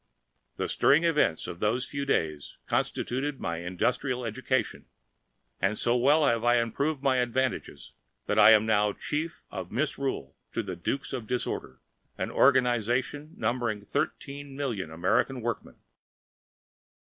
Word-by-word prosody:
The - - -1
stirring 150 +4 +4
events 150 - +2
of 85 - -7
those 120 +5 +1
few 140 +1 -4
days 75 - -1
constituted 135 +3 -1
my 85 0 -2
industrial 125 +8 -1
education, 130 +1 -2 0.7
and 100 +3 +1
so 120 - +2
well 145 +5 +4
have 115 -3 +2
I 120 0 +4
improved 135 +5 0
my 135 -2 +3
advantages 125 +1 -2 0.3
that - - +1
I - - +9
am 110 -1 +6
now 105 -2 +2
Chief 160 +3 -4
of 90 -2 -6
Misrule 135 - -2 0.2
to 115 - -1
the 95 -3 -5
Dukes 135 +13 -3
of 120 -4 -4
Disorder, 105 - -3 0.4
an - - -3
organization 130 - +2
numbering 115 -2 -1
thirteen 140 +5 -3
million 120 - -3
American 85 +10 +1
workingmen. 120 -1 -4
125 Hz, 135 wpm, -28 LUFS, 105-140 Hz, 0.7 s, I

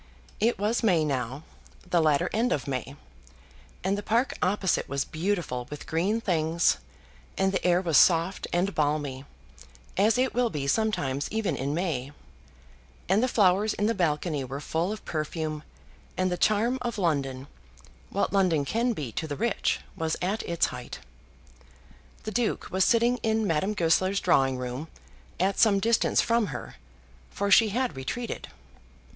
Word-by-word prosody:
It 230 +3 +2
was 210 +4 0
May 175 -8 +3
now, 135 0 -3 0.4
the 175 -2 +2
latter 155 +2 +2
end 230 +3 +1
of 145 - -1
May, 135 +1 -4 0.9
and 190 +2 +1
the 205 - -3
park 235 +5 +1
opposite 190 0 +1
was 140 -1 -1
beautiful 160 -8 -2
with 150 - -8
green 190 +8 0
things, 165 - +1 0.6
and 190 0 +2
the 190 - -1
air 180 0 +3
was 165 -6 +4
soft 170 +2 +3
and 185 +3 0
balmy, 145 -3 -1 0.7
as 210 +4 +4
it 255 0 +1
will 245 0 +2
be 150 -6 -3
sometimes 140 -6 0
even 220 -2 -1
in 140 +2 -2
May, 145 -6 -2 0.9
and 200 +3 +3
the 255 - +2
flowers 205 -2 +3
in 205 - 0
the 225 - +2
balcony 155 -5 0
were 135 +2 -5
full 165 +6 -1
of 215 - -7
perfume, 155 -1 -3 0.6
and 185 0 +1
the - - +1
charm 220 +7 +2
of 240 -2 -3
London, 140 -8 -1 0.6
what 200 - -1
London 180 -7 +2
can 235 - 0
be 145 - -5
to 160 - -4
the 145 - -4
rich, 230 +7 0
was 160 -3 -2
at 195 +5 -1
its 170 -1 +2
height. - - -7 1.3
The 215 - -4
Duke 235 +1 -1
was 190 +1 +3
sitting 235 +3 +3
in 220 -1 0
Madame 190 +4 0
Goesler's 185 +3 +2
drawing 135 -1 +2
room, 125 +4 -5 0.5
at 190 +2 +1
some 205 -3 +5
distance 225 +2 +2
from 230 -2 +1
her, 125 -6 -7 0.5
for 200 0 -2
she 220 +2 +7
had 245 - -1
retreated. 225 - -4
180 Hz, 160 wpm, -27 LUFS, 150-215 Hz, 1.3 s, she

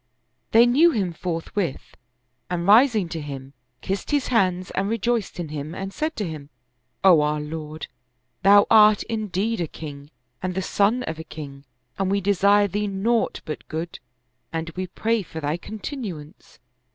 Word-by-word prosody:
They 230 +2 +6
knew 285 +8 +5
him 195 - -1
forthwith 165 -1 -4 0.5
and 175 -1 -2
rising 220 -1 +5
to 165 -1 -4
him, 135 -2 -8 0.3
kissed 195 +1 -3
his 290 -2 0
hands 185 -6 +1
and 195 +1 -1
rejoiced 230 -3 -1
in 165 -3 -4
him 150 +2 -5
and 195 0 -5
said 310 +1 -2
to 210 -4 -2
him, 150 -3 -8 0.3
" 125 +1 -47
O 180 -5 +7
our 150 0 0
lord, 155 +1 -6 0.6
thou 205 +1 +7
art 215 -2 +7
indeed 215 -1 -2
a 170 - -1
king 145 -2 -9 0.3
and 185 -1 -3
the 190 - 0
son 215 +7 +2
of 160 -5 -5
a - - -5
king, 140 -3 -9 0.3
and 195 -1 +1
we 200 +1 +2
desire 200 +1 +4
thee 205 +2 -2
naught 215 +4 0
but 155 - -6
good 165 +2 -5 0.5
and 165 0 -3
we 185 +3 -4
pray 225 +5 0
for 160 -3 -8
thy 150 0 -1
continuance. 195 - -8
185 Hz, 165 wpm, -24 LUFS, 160-210 Hz, 0.6 s, O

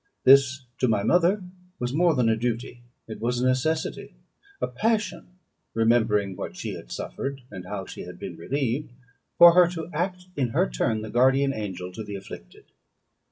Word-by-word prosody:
This, 135 0 +5
to 130 - +2
my 105 -3 +1
mother, 180 - +3 0.3
was 125 +1 -3
more 170 +1 +3
than 125 -3 +2
a 110 - +3
duty; 120 +1 -3 0.3
it 110 - -7
was 120 +1 0
a 125 - 0
necessity, 130 +5 -1 0.4
a - - 0
passion, 215 -4 -2 0.4
remembering 110 -4 +2
what - - -6
she - - -4
had - - -10
suffered, 135 - -5
and 90 -1 -8
how 95 0 -5
she - - -9
had 90 0 -9
been 95 -3 -7
relieved, 130 - -2 0.5
for 170 0 +10
her 180 0 +6
to 170 -1 -6
act 180 +3 -2
in 135 -3 +1
her - - +4
turn 110 - -1
the 110 - -7
guardian 135 +3 +3
angel 95 -5 -5
to 110 +4 -7
the 105 -1 -7
afflicted. 95 -11 -11
125 Hz, 175 wpm, -25 LUFS, 105-150 Hz, 0.5 s, for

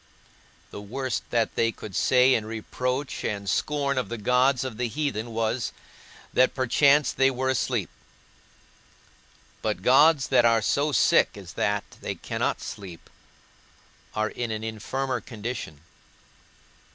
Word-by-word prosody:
The 100 - -7
worst 130 +4 -4
that 115 -2 0
they 115 0 +1
could 105 -4 -10
say 130 0 +4
in 110 - +1
reproach 125 +5 -3
and 100 -2 -3
scorn 140 +6 0
of 125 - -4
the 120 - -4
gods 125 +4 +2
of 130 -5 -5
the 125 0 -1
heathen 120 -4 -3
was, 115 +1 -1 0.6
that 130 - +3
perchance 140 +3 +4
they 135 0 +3
were 130 0 -1
asleep; 130 - 0 1.7
but - - -2
gods 145 +1 +5
that 125 -3 +5
are 115 -2 +4
so 145 +2 +1
sick 130 - +3
as - - -10
that 105 0 0 0.2
they - - -4
cannot - - -2
sleep 90 -5 -9 1.0
are 110 0 0
in 120 -1 -4
an 110 0 -4
infirmer 120 +3 -3
condition. 110 - -6
125 Hz, 135 wpm, -26 LUFS, 110-135 Hz, 1.7 s, gods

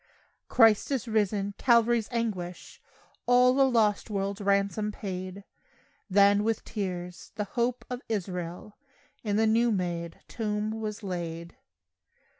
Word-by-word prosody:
Christ 225 -3 +4
is 265 -4 -1
risen! 205 -2 0
Calvary's 235 -2 +3
anguish 195 -7 -4 0.5
All 250 +2 +5
a 270 - +5
lost 220 -3 +2
world's 200 0 -2
ransom 200 +1 +1
paid; 185 -1 -6 0.7
Then, 200 +1 +5
with 225 0 -1
tears, 180 -3 -5
"the 210 - -1
hope 235 +4 -2
of 250 0 -5
Israel" 180 -1 -4 0.4
In 205 -3 -1
the 220 +1 +3
new 230 +2 +3
made 170 -4 -3
tomb 210 -2 -2
was 215 0 -5
laid. 170 -3 -5
210 Hz, 120 wpm, -28 LUFS, 185-225 Hz, 0.7 s, All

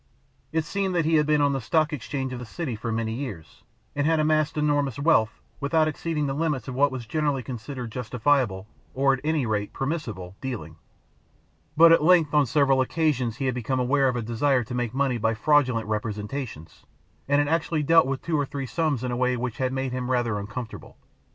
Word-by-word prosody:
It 160 0 0
seemed 195 +2 -2
that 165 -3 +2
he 160 0 +3
had 150 -1 +2
been 150 -1 +3
on 145 -1 +3
the 135 - -2
Stock 155 +6 +1
Exchange 130 0 -4
of 125 - -5
the - - -6
city 145 -3 -4
for 110 +2 -4
many 110 0 -2
years 110 - -7 0.3
and 145 +1 +1
had 160 -1 +3
amassed 155 0 +1
enormous 145 -4 +1
wealth, 140 -7 +2 0.2
without 155 +2 +2
exceeding 155 -1 -2
the 135 - -1
limits 150 -5 -1
of 130 - -4
what 140 +2 +3
was 130 -3 -6
generally 145 +1 -1
considered 125 -1 -6
justifiable, 125 -4 0 0.3
or 135 +1 +3
at 135 - -2
any 155 -3 0
rate, 105 -2 -2
permissible 115 - -4
dealing; 100 - -6 1.0
but 165 +1 +8
at 165 - +6
length 165 -3 +4
on 150 -2 +4
several 135 0 +3
occasions 130 -5 0
he 135 - -2
had 130 - +1
become 125 +2 -2
aware 135 +2 +2
of 125 - 0
a 120 - -2
desire 125 +3 +1
to 120 - -8
make 120 -2 -1
money 135 -3 +1
by 110 +1 +1
fraudulent 130 -2 +2
representations, 105 - -5 0.4
and 140 +1 +3
had 145 0 +2
actually 160 0 0
dealt 165 -1 +5
with 135 -1 -3
two 160 -3 0
or 145 - +1
three 140 0 -4
sums 135 0 -1
in 125 - -2
a - - -1
way 125 0 +1
which 120 -1 -4
had 130 -1 0
made 130 -1 -2
him 125 0 -3
rather 120 -5 0
uncomfortable. 110 +3 -7
135 Hz, 210 wpm, -25 LUFS, 120-150 Hz, 1.0 s, but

